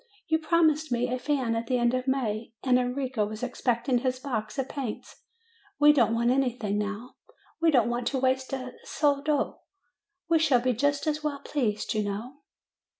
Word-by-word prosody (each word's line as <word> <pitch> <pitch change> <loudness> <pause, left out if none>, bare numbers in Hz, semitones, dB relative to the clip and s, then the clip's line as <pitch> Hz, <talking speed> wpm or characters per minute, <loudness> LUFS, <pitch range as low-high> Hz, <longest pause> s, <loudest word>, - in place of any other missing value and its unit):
You 320 0 +2
promised 315 -2 +2
me 240 +1 +1
a 255 - -2
fan 260 -4 0
at 230 0 -3
the 255 - +1
end 240 0 +2
of 255 +1 -2
May, 230 -4 -1
and 250 -1 +4
Enrico 250 -2 -1
was 215 +2 -5
expecting 245 0 0
his 255 0 -1
box 255 -3 -4
of 270 -1 -1
paints. 265 -7 -6 0.6
We 295 0 +7
don't 230 -5 +3
want 235 +1 +2
any 265 0 +3
thing 210 -3 -1
now; 210 +4 -5 0.4
we 330 - +5
don't 250 -7 +4
want 240 0 -2
to 275 - 0
waste 260 0 0
a 255 -2 -4
soldo; 290 0 0 0.7
we 330 -1 +4
shall 290 -6 +4
be 255 +1 +1
just 285 +5 0
as 305 0 -1
well 290 -2 -2
pleased, 235 -9 -1
you 215 - 0
know." 215 +7 -5
255 Hz, 185 wpm, -27 LUFS, 235-285 Hz, 0.7 s, We